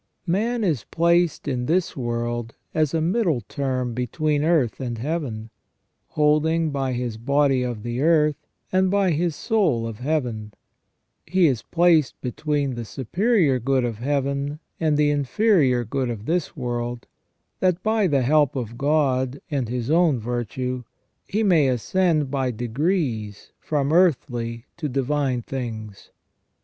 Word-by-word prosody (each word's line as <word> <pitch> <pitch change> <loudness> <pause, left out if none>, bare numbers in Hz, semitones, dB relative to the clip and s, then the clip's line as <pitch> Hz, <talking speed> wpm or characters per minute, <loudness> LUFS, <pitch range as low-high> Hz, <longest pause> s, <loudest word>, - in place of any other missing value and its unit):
Man 220 +6 0
is 155 - 0
placed 170 -1 +1
in 125 -3 -1
this 175 +2 +1
world 120 -2 -3 0.2
as 155 -2 +1
a 160 - +1
middle 170 - +1
term 130 +2 -2
between 145 +5 -1
earth 155 -8 +2
and 120 -3 -4
Heaven, 120 -5 -4 0.6
holding 155 +2 +2
by 135 -2 -1
his 120 -2 -3
body 140 +2 +2
of 120 -4 -3
the 120 +2 -3
earth, 150 -2 +2 0.2
and 185 0 +3
by 195 -2 +2
his 165 0 0
soul 175 - +1
of 115 -2 -6
Heaven, 125 -7 -2 0.7
He 185 +2 +3
is 130 -7 +2
placed 165 -5 +2
between 140 +2 -1
the 120 -1 -5
superior 155 - +1
good 130 +1 +1
of 115 -3 -4
Heaven 140 +2 -1 0.2
and 155 -2 +2
the 150 0 +3
inferior 145 - +2
good 130 +2 -2
of 110 -3 -5
this 170 +2 -1
world, 120 0 -3 0.5
that 185 -1 +1
by 220 -2 +2
the 140 -5 +2
help 145 +1 +3
of 120 -2 -5
God 140 -3 +1
and 135 -6 -1
his 125 +2 -2
own 165 -4 +4
virtue 125 +2 -3 0.4
he 215 +3 0
may 170 -9 +4
ascend 150 - +1
by 135 -2 0
degrees 120 - -2
from 145 -1 -1
earthly 120 -9 +1
to 155 -4 -3
divine 135 -1 0
things. 110 -6 -6
140 Hz, 140 wpm, -23 LUFS, 120-160 Hz, 0.7 s, own